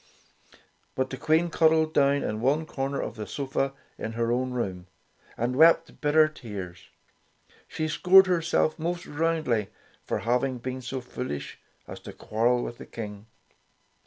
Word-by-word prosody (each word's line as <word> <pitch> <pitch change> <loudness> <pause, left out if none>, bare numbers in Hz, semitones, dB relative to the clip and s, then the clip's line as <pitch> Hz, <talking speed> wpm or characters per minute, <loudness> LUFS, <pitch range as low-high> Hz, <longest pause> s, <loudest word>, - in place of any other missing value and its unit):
But 130 0 -1
the 130 - -4
Queen 160 +5 +2
cuddled 160 -1 +3
down 140 0 +3
in 110 +1 -3
one 145 +6 +2
corner 135 -1 -3
of 115 - -4
the 105 - -5
sofa 135 -1 -2 0.3
in 110 - -4
her 115 0 0
own 130 +1 0
room, 95 -8 -4 0.5
and 120 +2 -1
wept 165 +4 +4
bitter 155 +1 +5
tears. 100 - -8 0.8
She 155 - -3
scored 185 +4 +6
herself 165 -3 +1
most 170 +2 -3
roundly 150 -9 0 0.4
for - - -2
having 125 +3 0
been 130 +1 -5
so 130 +1 -4
foolish 75 - -6 0.3
as - - -8
to - - -10
quarrel 120 +3 0
with 120 - -6
the - - -10
King. 105 -1 -8
130 Hz, 150 wpm, -27 LUFS, 115-155 Hz, 0.8 s, scored